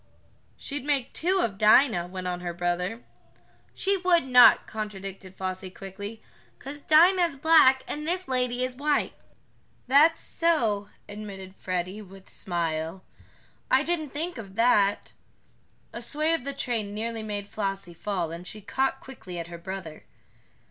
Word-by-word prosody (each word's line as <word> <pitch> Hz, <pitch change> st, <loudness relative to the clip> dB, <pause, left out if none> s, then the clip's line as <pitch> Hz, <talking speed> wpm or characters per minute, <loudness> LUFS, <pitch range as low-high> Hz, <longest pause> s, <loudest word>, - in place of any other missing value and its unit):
"She'd 285 Hz, -2 st, -5 dB
make 280 Hz, -3 st, 0 dB
make -, -, -33 dB
two 370 Hz, +3 st, +1 dB
of 200 Hz, -, -2 dB
Dinah," 215 Hz, -4 st, +5 dB
went 185 Hz, 0 st, -7 dB
on 180 Hz, -1 st, -2 dB
her 175 Hz, -1 st, -5 dB
brother. 180 Hz, +6 st, -2 dB, 0.7 s
"She 395 Hz, 0 st, +1 dB
would 355 Hz, -4 st, +3 dB
not," 250 Hz, -1 st, +7 dB
contradicted 195 Hz, -3 st, -7 dB
Flossie 185 Hz, 0 st, -4 dB
quickly. 200 Hz, +3 st, -9 dB, 0.3 s
"'Cause 285 Hz, +2 st, -8 dB
Dinah's 340 Hz, +1 st, +5 dB
black, 270 Hz, -3 st, +5 dB
and 300 Hz, +1 st, -4 dB
this 365 Hz, +2 st, -1 dB
lady 250 Hz, -1 st, 0 dB
is 255 Hz, 0 st, -6 dB
white." 290 Hz, +2 st, 0 dB, 0.7 s
"That's 295 Hz, +6 st, +5 dB
so," 225 Hz, -12 st, 0 dB, 0.2 s
admitted 200 Hz, -2 st, -8 dB
Freddie, 185 Hz, +3 st, -3 dB
with 195 Hz, -1 st, -14 dB
smile. 165 Hz, 0 st, -3 dB, 0.7 s
"I 265 Hz, +2 st, +4 dB
didn't 315 Hz, -2 st, -2 dB
think 315 Hz, 0 st, -4 dB
of 195 Hz, -3 st, -10 dB
that." 210 Hz, -3 st, +3 dB, 0.8 s
A -, -, -6 dB
sway 310 Hz, +2 st, 0 dB
of 325 Hz, -6 st, -2 dB
the 280 Hz, -, -3 dB
train 225 Hz, -6 st, -2 dB
nearly 225 Hz, +1 st, -3 dB
made 205 Hz, -2 st, -4 dB
Flossie 195 Hz, -3 st, -4 dB
fall, 175 Hz, -2 st, -3 dB
and 170 Hz, +2 st, -8 dB
she 215 Hz, -, -6 dB
caught 265 Hz, +6 st, -1 dB
quickly 185 Hz, -9 st, -9 dB
at 170 Hz, 0 st, -5 dB
her 170 Hz, -1 st, -8 dB
brother. 180 Hz, -3 st, -7 dB
215 Hz, 150 wpm, -27 LUFS, 190-280 Hz, 0.8 s, not